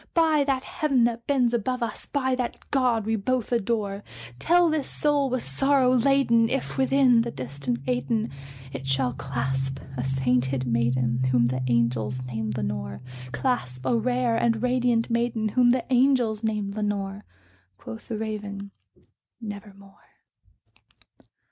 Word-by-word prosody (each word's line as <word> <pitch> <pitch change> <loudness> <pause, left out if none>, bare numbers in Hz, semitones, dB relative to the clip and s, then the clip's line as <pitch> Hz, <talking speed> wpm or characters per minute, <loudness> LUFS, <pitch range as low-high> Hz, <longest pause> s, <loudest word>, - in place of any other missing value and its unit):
By 320 -3 +4
that 270 -2 0
Heaven 275 -5 +1
that 235 0 -1
bends 255 -4 +2
above, 245 +2 -1
us 225 -2 -5
by 260 -2 0
that 250 -1 -2
God 245 -6 +2
we 225 +1 +1
both 245 +3 -1
adore 210 -3 -1 0.4
Tell 350 - +4
this 310 -3 -1
soul 290 -2 +1
with 255 -1 -3
sorrow 260 - +3
laden 240 -3 +3
if, 270 +2 -2
within 265 -3 +4
the 235 - -2
distant 130 - -4
Aidenn, 135 - 0 0.4
It 135 0 -6
shall 135 -2 +1
clasp 135 0 -3 0.2
a 125 - -2
sainted 130 0 0
maiden 120 +1 +1
whom 125 -2 +3
the 130 +2 -1
angels 120 +1 0
name 110 -3 -3
Lenore 65 - -4 0.3
Clasp 130 - -2
a 240 - +2
rare 245 0 +1
and 230 -1 +1
radiant 245 -2 +1
maiden 235 -2 0
whom 245 +2 +4
the 250 0 +2
angels 245 -4 +3
name 210 -2 -1
Lenore." 205 -1 -3 0.5
Quoth 110 0 -9
the 225 - -3
Raven, 205 -2 -5 0.7
"Nevermore." 200 -3 -10
220 Hz, 140 wpm, -25 LUFS, -, 0.7 s, By